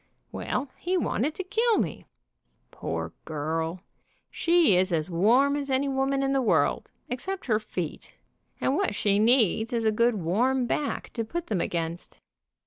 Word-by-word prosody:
Well, 275 Hz, -, -3 dB
he 365 Hz, +1 st, 0 dB
wanted 300 Hz, -3 st, -1 dB
to 380 Hz, -, -3 dB
kill 450 Hz, +4 st, +2 dB
me. -, -, -3 dB, 0.6 s
Poor -, -, -4 dB
girl, 160 Hz, +3 st, -3 dB, 0.5 s
she 335 Hz, -, +4 dB
is 185 Hz, +1 st, +3 dB
as 165 Hz, +1 st, 0 dB
warm 240 Hz, +11 st, +4 dB
as 285 Hz, -1 st, -3 dB
any 265 Hz, +1 st, +1 dB
woman 270 Hz, 0 st, 0 dB
in 270 Hz, -, +1 dB
the 270 Hz, -1 st, +2 dB
world, 170 Hz, -, +1 dB, 0.2 s
except 370 Hz, +11 st, -4 dB
her 215 Hz, -4 st, +2 dB
feet, 180 Hz, -7 st, -6 dB, 0.4 s
and 265 Hz, -, +1 dB
what 385 Hz, -, 0 dB
she 200 Hz, -1 st, +2 dB
needs 225 Hz, -1 st, +3 dB
is 230 Hz, -2 st, -1 dB
a 220 Hz, -, +4 dB
good 235 Hz, +2 st, +2 dB
warm 235 Hz, +9 st, +1 dB
back 285 Hz, +4 st, -2 dB
to 230 Hz, -, -2 dB
put 340 Hz, +10 st, -4 dB
them 195 Hz, -6 st, -1 dB
against. 170 Hz, 0 st, -4 dB
235 Hz, 160 wpm, -27 LUFS, 185-275 Hz, 0.6 s, she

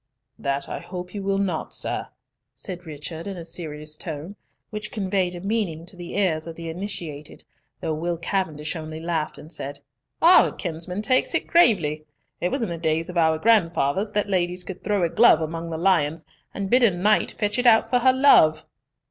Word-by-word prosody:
"That 140 Hz, 0 st, -1 dB
I -, -, -5 dB
hope 180 Hz, -1 st, -8 dB
you 205 Hz, -, -4 dB
will 195 Hz, 0 st, 0 dB
not, 185 Hz, -5 st, -2 dB
sir," -, -, -2 dB, 0.5 s
said 180 Hz, -3 st, -8 dB
Richard, 155 Hz, +3 st, -7 dB
in 195 Hz, -2 st, -5 dB
a 170 Hz, -, -7 dB
serious 155 Hz, -2 st, -6 dB
tone, 160 Hz, +4 st, -6 dB, 0.4 s
which 215 Hz, 0 st, -5 dB
conveyed 190 Hz, -3 st, -1 dB
a 175 Hz, -, -7 dB
meaning 195 Hz, -6 st, -2 dB
to 180 Hz, -, -7 dB
the 175 Hz, +1 st, -7 dB
ears 170 Hz, -5 st, +1 dB
of 165 Hz, -, -7 dB
the 165 Hz, 0 st, -6 dB
initiated, 165 Hz, -5 st, -6 dB, 0.4 s
though 160 Hz, -, -1 dB
Will 170 Hz, +2 st, -2 dB
Cavendish 165 Hz, -3 st, -2 dB
only 155 Hz, -1 st, -6 dB
laughed, 165 Hz, -2 st, -2 dB
and 155 Hz, +3 st, -9 dB
said, 140 Hz, +1 st, -4 dB, 0.4 s
"Our 345 Hz, +3 st, +6 dB
kinsman 180 Hz, +3 st, -4 dB
takes 255 Hz, +3 st, +2 dB
it -, -, 0 dB
gravely! 165 Hz, -, +3 dB, 0.3 s
It 180 Hz, -, 0 dB
was 265 Hz, +3 st, -1 dB
in 220 Hz, -, -2 dB
the 170 Hz, -1 st, -4 dB
days 165 Hz, +2 st, 0 dB
of 180 Hz, -, -6 dB
our 160 Hz, -1 st, +3 dB
grandfathers 190 Hz, -2 st, +2 dB
that 210 Hz, 0 st, 0 dB
ladies 180 Hz, -2 st, 0 dB
could 185 Hz, +1 st, -8 dB
throw 205 Hz, -3 st, +1 dB
a 170 Hz, -, +2 dB
glove 235 Hz, +7 st, +6 dB
among 165 Hz, +1 st, -4 dB
the 160 Hz, -, -3 dB
lions, 165 Hz, -3 st, +1 dB, 0.3 s
and 200 Hz, -1 st, -4 dB
bid 250 Hz, +1 st, +5 dB
a 235 Hz, -, +6 dB
knight 200 Hz, +4 st, +2 dB
fetch 210 Hz, +1 st, -1 dB
it 245 Hz, -, +2 dB
out 225 Hz, 0 st, +5 dB
for 250 Hz, -, +4 dB
her 260 Hz, +2 st, +5 dB
love." 255 Hz, -, +5 dB
175 Hz, 195 wpm, -24 LUFS, 160-200 Hz, 0.5 s, Our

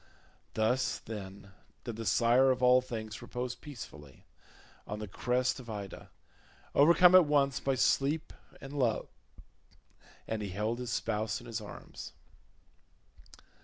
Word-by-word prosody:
Thus, 115 Hz, +4 st, +1 dB
then, 100 Hz, -2 st, -9 dB, 0.3 s
did 120 Hz, -, -5 dB
the 115 Hz, -1 st, -5 dB
sire 125 Hz, +3 st, +4 dB
of 130 Hz, -1 st, +1 dB
all 125 Hz, 0 st, +6 dB
things 110 Hz, -3 st, -6 dB
repose 125 Hz, 0 st, -4 dB
peacefully 75 Hz, -, -11 dB, 0.6 s
on 105 Hz, -, -4 dB
the 105 Hz, 0 st, -6 dB
crest 125 Hz, +6 st, 0 dB
of 120 Hz, -2 st, -11 dB
Ida, 100 Hz, -3 st, -7 dB, 0.6 s
overcome 170 Hz, +5 st, +7 dB
at 185 Hz, -2 st, +9 dB
once 140 Hz, -3 st, +2 dB
by 135 Hz, -1 st, 0 dB
sleep 140 Hz, +4 st, +1 dB, 0.3 s
and 135 Hz, +1 st, -9 dB
love, 125 Hz, -6 st, 0 dB, 1.2 s
and 110 Hz, -1 st, -2 dB
he 100 Hz, -, -4 dB
held 105 Hz, +5 st, -2 dB
his 125 Hz, -1 st, -4 dB
spouse 110 Hz, -1 st, -1 dB
in 120 Hz, -, -13 dB
his 115 Hz, -2 st, -4 dB
arms. 105 Hz, -, -9 dB
120 Hz, 130 wpm, -31 LUFS, 105-130 Hz, 1.2 s, at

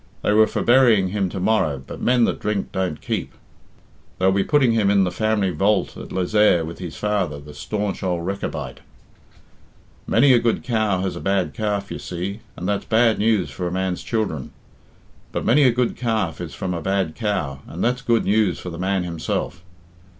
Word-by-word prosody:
"They 105 Hz, -, +2 dB
were 110 Hz, +1 st, +6 dB
for -, -, -2 dB
burying 120 Hz, -6 st, +5 dB
him 95 Hz, -1 st, -1 dB
to 95 Hz, -, -5 dB
morrow, 90 Hz, -7 st, +1 dB
but -, -, -9 dB
men 125 Hz, -1 st, +3 dB
that -, -, +1 dB
drink 105 Hz, -2 st, -2 dB
don't 90 Hz, -5 st, -2 dB
keep. -, -, -3 dB, 0.8 s
They'll 95 Hz, +1 st, +3 dB
be 95 Hz, 0 st, +2 dB
putting 135 Hz, -2 st, +3 dB
him 110 Hz, -3 st, +2 dB
in 100 Hz, -1 st, +4 dB
the 90 Hz, -, 0 dB
family 105 Hz, 0 st, 0 dB
vault 95 Hz, +4 st, +1 dB
at -, -, -9 dB
Lezayre 95 Hz, -2 st, +3 dB
with 85 Hz, +1 st, -8 dB
his 90 Hz, -3 st, -6 dB
father, 100 Hz, -8 st, -1 dB
the 75 Hz, +1 st, -12 dB
staunch 100 Hz, +6 st, -3 dB
ould 90 Hz, -3 st, -1 dB
Rechabite. 100 Hz, +1 st, -4 dB, 1.3 s
Many 130 Hz, +4 st, +5 dB
a 120 Hz, -, +5 dB
good 115 Hz, -1 st, 0 dB
cow 110 Hz, -6 st, 0 dB
has 95 Hz, -, -2 dB
a -, -, -5 dB
bad 95 Hz, 0 st, 0 dB
calf, 105 Hz, -3 st, -2 dB
you -, -, -5 dB
see, 95 Hz, +4 st, -5 dB, 0.2 s
and 90 Hz, -, -4 dB
that's 100 Hz, -1 st, -1 dB
bad 115 Hz, 0 st, +3 dB
news 105 Hz, -8 st, +1 dB
for 90 Hz, +5 st, -4 dB
a -, -, -4 dB
man's 95 Hz, -1 st, -2 dB
children; 95 Hz, -, -2 dB, 0.8 s
but -, -, -3 dB
many 150 Hz, -, +4 dB
a 125 Hz, -, +6 dB
good 120 Hz, 0 st, 0 dB
calf 110 Hz, -, -1 dB
is -, -, -6 dB
from 95 Hz, -1 st, -3 dB
a 85 Hz, -, -3 dB
bad 95 Hz, -4 st, 0 dB
cow, 80 Hz, -, -2 dB
and 85 Hz, -, -5 dB
that's 125 Hz, +1 st, +1 dB
good 120 Hz, -3 st, +1 dB
news 105 Hz, -5 st, +2 dB
for 90 Hz, -, -7 dB
the 85 Hz, -, -8 dB
man 95 Hz, 0 st, 0 dB
himself. 85 Hz, +1 st, -3 dB
100 Hz, 195 wpm, -22 LUFS, 90-110 Hz, 1.3 s, were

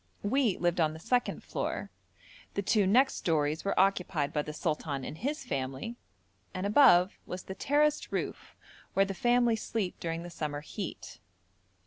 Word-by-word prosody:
We 225 Hz, -1 st, +2 dB
lived 175 Hz, 0 st, 0 dB
on 155 Hz, -2 st, +2 dB
the 160 Hz, -, -9 dB
second 245 Hz, +8 st, 0 dB
floor, -, -, -3 dB, 0.6 s
the 200 Hz, -, -1 dB
two 200 Hz, 0 st, +3 dB
next 255 Hz, +7 st, +4 dB
stories 155 Hz, -1 st, 0 dB
were 200 Hz, -, 0 dB
occupied 180 Hz, -6 st, +1 dB
by 150 Hz, -, +1 dB
the 150 Hz, -, -6 dB
sultan 150 Hz, -3 st, -2 dB
and -, -, -6 dB
his 280 Hz, -, -3 dB
family, 135 Hz, -, -3 dB, 0.6 s
and 185 Hz, +1 st, -2 dB
above 200 Hz, -5 st, +5 dB
was 185 Hz, +1 st, -5 dB
the 190 Hz, -, -6 dB
terraced 295 Hz, +7 st, +1 dB
roof -, -, -4 dB, 0.4 s
where 195 Hz, -, +5 dB
the 195 Hz, -, -4 dB
family 240 Hz, +3 st, +3 dB
sleep 220 Hz, -4 st, -3 dB
during 165 Hz, 0 st, -3 dB
the 175 Hz, -, -8 dB
summer 145 Hz, -3 st, -4 dB
heat. 190 Hz, +5 st, -7 dB
185 Hz, 160 wpm, -30 LUFS, 155-230 Hz, 0.6 s, above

